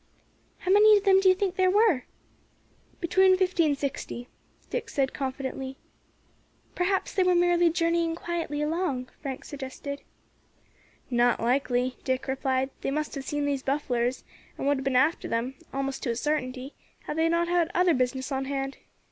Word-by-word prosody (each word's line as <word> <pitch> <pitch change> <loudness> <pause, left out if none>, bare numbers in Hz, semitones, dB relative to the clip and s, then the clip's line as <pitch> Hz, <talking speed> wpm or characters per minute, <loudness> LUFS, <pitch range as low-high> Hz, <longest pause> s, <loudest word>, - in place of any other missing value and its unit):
"How 370 - -2
many 420 +1 +7
of 400 - -2
them 385 -2 +6
do 385 -1 +5
you 370 - +5
think 380 -1 -1
there 370 -1 +4
were?" 395 - +3 0.9
"Between 375 +2 +4
fifty 365 -3 +2
and 285 -2 +1
sixty," 265 -3 -4 0.4
Dick 465 -2 -3
said 270 -7 0
confidently. 265 0 -4 1.0
"Perhaps 380 +2 0
they 385 - +2
were 365 -1 +4
merely 350 0 +4
journeying 335 0 +1
quietly 330 -4 -3
along," 300 -5 -1
Frank 270 -3 -5
suggested. 280 0 -6 1.1
"Not 240 0 +3
likely," 250 +1 0
Dick 260 -1 -1
replied; 265 0 0
"they - - -1
must 300 +2 -2
have 275 -2 -5
seen 290 -1 -1
these 280 -2 -1
bufflars, 255 -3 -1 0.3
and - - -4
would 285 0 +3
have 265 - -4
been 265 -1 0
after 295 +6 +2
them, 230 +3 -1 0.2
almost 275 0 -3
to 255 - -2
a 235 - 0
sartinty, 265 -1 -2 0.3
had - - -5
they 325 +1 +2
not 340 +1 +1
had 345 -1 +2
other 360 0 +4
business 260 +1 -1
on 270 0 -1
hand. 270 0 -3
285 Hz, 165 wpm, -27 LUFS, 265-345 Hz, 1.1 s, many